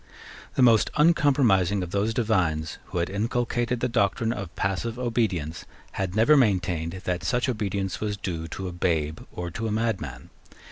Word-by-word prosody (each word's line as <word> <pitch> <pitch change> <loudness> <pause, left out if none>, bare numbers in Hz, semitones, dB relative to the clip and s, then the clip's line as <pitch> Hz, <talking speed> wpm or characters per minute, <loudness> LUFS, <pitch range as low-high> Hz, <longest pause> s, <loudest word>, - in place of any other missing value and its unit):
The 130 - +4
most 115 -3 +5
uncompromising 130 - +3
of 90 - -6
those 100 +3 +1
divines 90 -10 0
who - - -6
had 85 - +1
inculcated 120 +3 -1
the 125 - +2
doctrine 115 0 +1
of 100 -6 -7
passive 105 +5 -2
obedience 110 -11 -1 0.3
had 95 -1 -3
never 115 +8 +5
maintained 95 - +1
that 90 -1 -2
such 125 0 0
obedience 100 -6 -2
was 105 -1 -2
due 85 -4 -4
to 95 +3 -5
a - - -4
babe 80 -3 0
or 85 -1 -5
to 115 +6 -3
a - - -2
madman. 105 - -2
100 Hz, 160 wpm, -26 LUFS, 90-115 Hz, 0.3 s, most